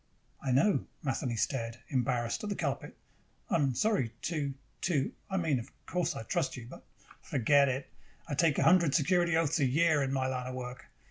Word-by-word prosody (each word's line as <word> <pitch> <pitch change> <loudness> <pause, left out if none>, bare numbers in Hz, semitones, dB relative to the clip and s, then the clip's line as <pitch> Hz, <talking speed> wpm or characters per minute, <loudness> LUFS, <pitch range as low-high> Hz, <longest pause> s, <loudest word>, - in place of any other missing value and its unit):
"I 135 - -1
know." 140 +11 +3 0.2
Matheny 130 -3 -1
stared, 115 -1 -1
embarrassed, 125 - 0
at 210 - -3
the 200 - -1
carpet. - - -3 0.5
"I'm 140 -6 +2
sorry 205 - +1
to 150 -5 -1 0.3
to 150 -7 +1 0.2
I 190 - -1
mean 160 -7 +1
of 120 +4 -9
course 180 -2 -1
I - - -5
trust 150 +3 -1
you, 120 - -8
but - - -11 0.2
" - - -22
"Forget 140 +3 +4
it. 130 +1 -2 0.4
I 150 - -3
take 150 +1 +3
a - - +3
hundred 170 -4 +5
security 175 +1 +3
oaths 165 0 +1
a 140 - +3
year, 155 +3 +3
in 135 -1 0
my 135 -1 0
line 130 -1 -2
of 130 - -5
work. 125 0 -7
140 Hz, 195 wpm, -31 LUFS, 130-165 Hz, 0.5 s, hundred